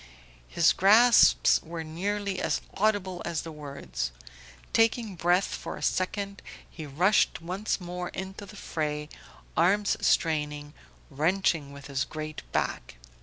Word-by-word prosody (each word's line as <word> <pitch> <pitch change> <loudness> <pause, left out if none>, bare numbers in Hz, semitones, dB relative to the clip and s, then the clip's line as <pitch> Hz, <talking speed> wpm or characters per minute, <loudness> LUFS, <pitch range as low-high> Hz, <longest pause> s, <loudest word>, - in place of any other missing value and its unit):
His 165 -1 +3
gasps 225 +5 +6
were 165 0 -6
nearly 195 +4 -3
as - - 0
audible 195 -3 0
as 170 -2 -3
the 165 - -7
words. 140 - -5 0.6
Taking 225 -2 +2
breath 175 +3 +2
for - - -6
a - - -8
second 200 +2 -1 0.3
he 155 -3 -9
rushed 180 +9 +2
once 185 +6 -3
more 180 0 -5
into 190 +2 -7
the 210 - -12
fray, 150 -5 -3 0.5
arms 200 +5 +3
straining, 150 -3 0 0.4
wrenching 160 0 0
with 140 -1 -11
his 140 -1 -1
great 155 0 -6
back. - - -2
175 Hz, 125 wpm, -28 LUFS, 150-200 Hz, 0.6 s, gasps